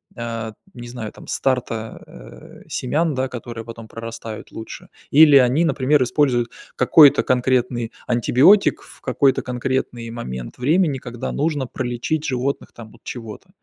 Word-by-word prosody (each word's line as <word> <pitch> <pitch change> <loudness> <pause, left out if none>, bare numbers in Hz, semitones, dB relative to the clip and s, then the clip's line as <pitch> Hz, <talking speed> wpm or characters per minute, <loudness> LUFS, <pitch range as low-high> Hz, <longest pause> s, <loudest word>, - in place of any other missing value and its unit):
а, 115 -2 -5 0.2
не 120 0 -8
знаю, 115 -3 -6
там - - -14
старта, 115 -4 -2
э, - - -14
семян, 150 +3 -1
да, 130 0 -1
которые 115 -2 -7
потом 115 -1 -10
прорастают 115 -1 -8
лучше. 110 - -9 0.2
Или 150 -1 +8
они, 135 +6 +4
например, 140 -1 +2
используют 120 -2 +1 0.3
какой-то 145 +3 +6
конкретный 125 -2 0 0.2
антибиотик, 125 - +4
в - - -17
какой-то 135 +1 +2
конкретный 125 -1 -3
момент 65 - -7
времени, 150 0 +2
когда 120 -1 -6
нужно 145 -3 -1
пролечить 130 +6 -3
животных 130 +1 -2
там 110 -2 -12
от - - -21
чего-то. 115 -4 -8
125 Hz, 135 wpm, -21 LUFS, 115-135 Hz, 0.3 s, Или